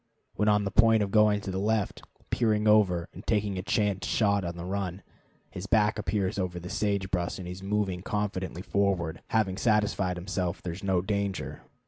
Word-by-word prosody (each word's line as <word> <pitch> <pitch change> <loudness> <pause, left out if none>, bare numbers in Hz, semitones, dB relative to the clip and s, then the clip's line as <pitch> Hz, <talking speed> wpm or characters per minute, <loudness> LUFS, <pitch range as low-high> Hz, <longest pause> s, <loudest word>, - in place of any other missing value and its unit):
When 105 - 0
on 105 -1 +4
the 100 - -2
point 110 -2 +5
of 100 - -3
going 105 -1 +4
to 95 - -4
the 95 - -2
left, 105 0 0 0.3
peering 110 -2 +2
over, 95 -5 +4
and - - -10
taking 105 -3 0
a - - -2
chance 100 0 0
shot 100 -3 +2
on 85 0 -4
the 85 - -6
run, 95 0 -3 0.5
his 90 +2 -6
back 105 -1 +3
appears 100 -1 -1
over 90 -2 -2
the 90 +1 -8
sage 100 -2 -1
brush 90 -2 -1
and 95 - -7
he - - -5
is 90 +1 -8
moving 100 -2 -1
confidently 95 -3 -3
forward, 90 -3 0
having 100 -4 +1
satisfied 100 -4 +1
himself 90 -1 -2
there 85 - -3
is 95 - -9
no 95 -2 +1
danger. 100 -1 -2
100 Hz, 195 wpm, -28 LUFS, 90-105 Hz, 0.5 s, point